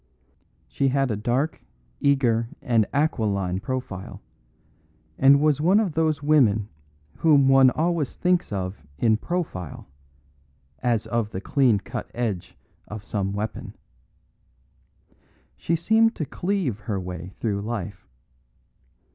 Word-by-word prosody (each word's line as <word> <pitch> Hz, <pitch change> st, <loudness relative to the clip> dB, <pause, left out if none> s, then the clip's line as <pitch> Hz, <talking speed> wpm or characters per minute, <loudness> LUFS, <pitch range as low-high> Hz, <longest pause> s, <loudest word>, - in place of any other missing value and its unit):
She 140 Hz, -, 0 dB
had 135 Hz, -1 st, +1 dB
a -, -, 0 dB
dark, 125 Hz, +9 st, -1 dB, 0.4 s
eager 120 Hz, -5 st, +2 dB
and 115 Hz, -4 st, +2 dB
aquiline 100 Hz, -, 0 dB
profile, 125 Hz, -5 st, -5 dB, 1.0 s
and 140 Hz, +1 st, +7 dB
was 150 Hz, -1 st, +2 dB
one 185 Hz, +6 st, +4 dB
of 200 Hz, -7 st, 0 dB
those 155 Hz, -2 st, 0 dB
women 115 Hz, -9 st, +3 dB, 0.5 s
whom 145 Hz, -4 st, +4 dB
one 135 Hz, -1 st, +7 dB
always 160 Hz, 0 st, -1 dB
thinks 180 Hz, -5 st, +1 dB
of 95 Hz, -3 st, -4 dB, 0.2 s
in 110 Hz, +4 st, +3 dB
profile, 110 Hz, -, -4 dB, 0.9 s
as 115 Hz, -3 st, 0 dB
of 115 Hz, -3 st, -1 dB
the 95 Hz, -, -5 dB
clean 125 Hz, +1 st, +2 dB
cut 100 Hz, -, -6 dB
edge 110 Hz, -7 st, -3 dB, 0.3 s
of 105 Hz, -1 st, -7 dB
some 100 Hz, -1 st, -2 dB
weapon. 105 Hz, +2 st, -5 dB, 1.8 s
She 170 Hz, -, -1 dB
seemed 220 Hz, +7 st, +3 dB
to 155 Hz, -, -3 dB
cleave 175 Hz, -, -2 dB
her 105 Hz, -2 st, -3 dB
way 90 Hz, 0 st, -7 dB
through 100 Hz, -3 st, -1 dB
life. 105 Hz, -5 st, -5 dB
120 Hz, 120 wpm, -24 LUFS, 105-150 Hz, 1.8 s, and